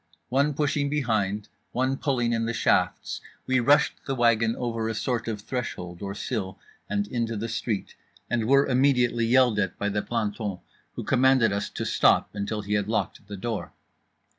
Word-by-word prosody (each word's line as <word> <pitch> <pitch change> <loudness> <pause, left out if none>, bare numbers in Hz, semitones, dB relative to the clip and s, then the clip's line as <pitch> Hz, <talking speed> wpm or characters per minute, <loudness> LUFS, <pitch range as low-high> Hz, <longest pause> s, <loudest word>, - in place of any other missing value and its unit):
One 140 +3 +2
pushing 145 -1 +1
behind, 110 -8 0 0.3
one 130 +2 +1
pulling 125 -4 0
in 115 0 0
the 115 - -2
shafts, - - +1 0.2
we 130 0 +2
rushed 140 +4 +3
the 135 - -1
wagon 115 -2 +3
over 115 -2 -2
a 110 - -3
sort 120 +1 -1
of 110 -2 -3
threshold 90 -8 -5
or 100 0 -4
sill 100 -4 -3 0.3
and 100 0 0
into 115 -1 -2
the 110 +3 -3
street; 110 -2 -3 0.3
and 115 -2 0
were 140 +2 +5
immediately 125 -3 +2
yelled 125 -3 +4
at 95 -3 -1
by 105 - -1
the 105 0 0
planton, 105 -4 -2 0.4
who - - -4
commanded 130 -4 +4
us 100 - -2
to - - -4
stop - - +3
until 105 +1 -3
he 100 +1 -3
had 105 -1 +1
locked 110 -2 -2
the 100 -1 -7
door. 110 +2 -4
115 Hz, 175 wpm, -26 LUFS, 105-130 Hz, 0.4 s, were